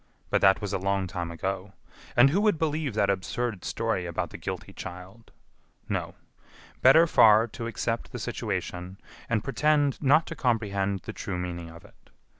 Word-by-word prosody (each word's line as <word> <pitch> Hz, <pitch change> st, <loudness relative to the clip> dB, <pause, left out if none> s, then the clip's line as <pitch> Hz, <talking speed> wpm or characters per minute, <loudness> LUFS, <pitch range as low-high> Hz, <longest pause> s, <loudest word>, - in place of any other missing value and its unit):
But -, -, +2 dB
that 95 Hz, -1 st, +5 dB
was 100 Hz, -1 st, -4 dB
a -, -, 0 dB
long 100 Hz, 0 st, 0 dB
time 90 Hz, -2 st, -4 dB
ago! 95 Hz, +3 st, -4 dB, 0.4 s
And 130 Hz, +3 st, +6 dB
who 195 Hz, +6 st, +2 dB
would 210 Hz, -5 st, +3 dB
believe 155 Hz, -5 st, -1 dB
that 100 Hz, -2 st, +3 dB
absurd 100 Hz, +1 st, -3 dB
story 110 Hz, -6 st, -2 dB
about 85 Hz, -, -3 dB
the -, -, -7 dB
guilty -, -, -6 dB
child? 95 Hz, +5 st, -10 dB, 0.6 s
No; -, -, -3 dB, 0.7 s
better 150 Hz, +6 st, +7 dB
far 110 Hz, -8 st, +6 dB
to 115 Hz, +2 st, -6 dB
accept 115 Hz, +1 st, -3 dB
the -, -, -5 dB
situation, 90 Hz, +2 st, -4 dB, 0.3 s
and 110 Hz, -3 st, 0 dB
pretend 145 Hz, 0 st, +1 dB
not 150 Hz, +3 st, +4 dB
to 165 Hz, -, -7 dB
comprehend 100 Hz, -, 0 dB
the -, -, -7 dB
true 90 Hz, -, -4 dB
meaning 85 Hz, -2 st, -5 dB
of 85 Hz, +1 st, -13 dB
it. -, -, -22 dB
105 Hz, 170 wpm, -27 LUFS, 95-130 Hz, 0.7 s, better